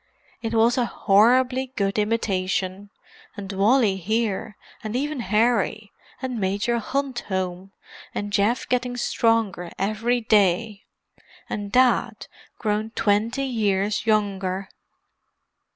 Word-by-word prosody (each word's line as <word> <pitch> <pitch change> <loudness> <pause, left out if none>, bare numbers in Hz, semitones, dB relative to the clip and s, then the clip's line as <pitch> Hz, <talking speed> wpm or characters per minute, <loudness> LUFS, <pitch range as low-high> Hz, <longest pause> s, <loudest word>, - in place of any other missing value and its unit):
"It 230 0 -3
was 230 +3 +3
a 245 - +2
horribly 250 +6 +3
good 200 -1 0
imitation. 200 -2 -1 0.5
And 195 -1 -6
Wally 205 +1 +3
here, 215 +2 -2 0.3
and 215 +1 -4
even 290 +2 -2
Harry; 215 -1 +1 0.3
and 255 -3 -3
Major 205 +5 0
Hunt 270 +2 -2
home; 190 0 -3 0.4
and 205 0 -4
Geoff 210 +5 +1
getting 250 0 -1
stronger 225 -7 0
every 220 +5 0
day. 210 -1 +2 0.6
And 205 -1 -5
Dad 255 +2 +2 0.3
grown 215 0 -1
twenty 225 +6 +1
years 210 -3 0
younger." 195 -3 0
215 Hz, 105 wpm, -24 LUFS, 195-240 Hz, 0.6 s, was